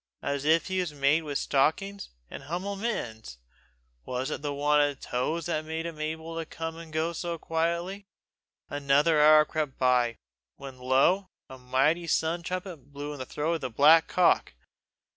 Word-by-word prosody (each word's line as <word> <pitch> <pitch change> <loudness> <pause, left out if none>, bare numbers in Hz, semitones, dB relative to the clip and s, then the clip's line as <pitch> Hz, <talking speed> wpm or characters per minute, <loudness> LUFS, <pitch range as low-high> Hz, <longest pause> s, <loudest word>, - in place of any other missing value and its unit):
as 140 0 -2
if 160 +2 +3
he 185 0 -2
was 175 -4 -2
made 140 +3 +3
with 145 -3 -3
stockings, 195 +9 0 0.2
and - - -10
hum'le 180 +6 -3
mittens! 120 - -4 0.7
Was 130 +3 -3
it - - -4
the 145 -1 -3
want 145 +1 +2
of 145 -2 0
toes 155 +7 -2
that 155 -3 -1
made 160 +1 -4
him 160 -2 -6
able 160 +1 -4
to - - -2
come 165 0 -6
and 165 -1 -10
go 160 +2 -1
so 170 0 -4
quietly? 170 +5 -2 0.6
Another 145 +2 +2
hour 155 0 +7
crept 150 -4 -3
by; 125 -3 +2 0.4
when 135 -2 -10
lo, 135 +10 +2 0.2
a 130 - -11
mighty 135 +7 +1
sun 165 +2 0
trumpet 175 -5 -6
blew 145 +1 -6
in 145 - -9
the 130 - -6
throat 155 +3 -1
of 165 - -3
the 130 - -3
black 150 +7 +6
cock! 175 - +2
155 Hz, 175 wpm, -28 LUFS, 140-170 Hz, 0.7 s, hour